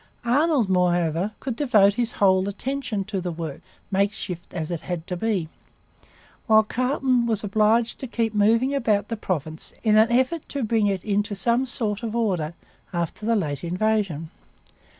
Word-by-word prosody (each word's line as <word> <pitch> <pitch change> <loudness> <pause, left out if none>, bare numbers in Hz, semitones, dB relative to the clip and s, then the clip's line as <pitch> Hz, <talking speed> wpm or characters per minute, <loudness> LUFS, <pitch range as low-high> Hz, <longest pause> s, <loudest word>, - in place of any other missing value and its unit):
Arnold, 280 -1 +3
moreover, 175 +1 +1
could 255 -4 -4
devote 215 -8 +4
his 235 +1 -1
whole 190 -1 +3
attention 235 -1 -3
to 195 -1 -3
the 180 0 -3
work, 160 -3 -6 0.3
makeshift 195 -3 -2
as 165 -1 -4
it 170 - -3
had 175 -3 -4
to 180 - -4
be; 190 -3 -1 1.0
while 220 0 +6
Carleton 250 +1 +1
was 220 -2 0
obliged 220 +3 +2
to 265 - -5
keep 230 -2 -1
moving 225 +6 +3
about 215 -7 +1
the 230 - -1
province 160 -6 -4
in 215 -2 +4
an 220 +2 +5
effort 260 +6 +1
to 280 -2 -3
bring 220 -1 +2
it 195 -3 -2
into 205 0 0
some 235 +6 +1
sort 215 -3 -2
of 230 -1 -4
order 180 -9 -1 0.4
after 175 +4 -3
the 230 - +3
late 150 -8 -2
invasion. 180 -3 -1
210 Hz, 165 wpm, -24 LUFS, 180-235 Hz, 1.0 s, while